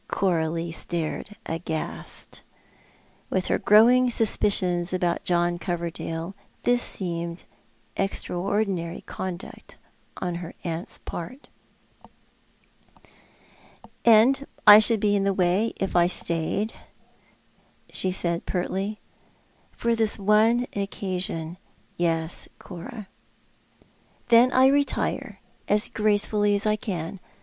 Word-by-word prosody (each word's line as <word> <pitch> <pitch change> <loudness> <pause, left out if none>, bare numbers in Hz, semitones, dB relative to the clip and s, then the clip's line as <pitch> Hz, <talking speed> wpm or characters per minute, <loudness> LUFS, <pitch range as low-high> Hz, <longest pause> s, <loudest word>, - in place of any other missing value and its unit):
Coralie 165 -2 0
stared 170 +4 -4
aghast. 160 -1 -6 0.9
"With 185 -1 -1
her - - +1
growing 245 +4 +5
suspicions 190 -6 +2
about 175 -2 0
John 175 0 +1
Coverdale, 170 0 -4 0.3
this 245 0 +4
seemed 170 -4 -3 0.5
extraordinary 195 -2 -1
conduct 185 -1 -8 0.4
on 180 -1 -3
her 170 - -8
aunt's 165 0 -5
part. 255 - -8 2.5
"And 240 +5 +5 0.2
I 210 -1 +11
should 220 0 +2
be 205 0 +2
in 200 - +1
the 195 -1 +1
way 185 +5 +2
if 195 - -3
I 175 0 +5
stayed," 175 +5 -2 1.2
she 185 - 0
said 170 -1 -2
pertly. 195 +3 -2 0.4
" - - -36
For 235 0 +1
this 220 -2 +2
one 215 +4 +3
occasion, 185 -4 -4 0.4
yes, 165 -1 0
Cora." 190 +3 -9 1.2
"Then 240 +2 +6
I 260 +1 +5
retire, 280 +1 0 0.3
as 210 +1 +2
gracefully 210 -1 +1
as 200 - -1
I 215 0 +3
can. 190 -4 -5
190 Hz, 100 wpm, -25 LUFS, 170-215 Hz, 2.5 s, I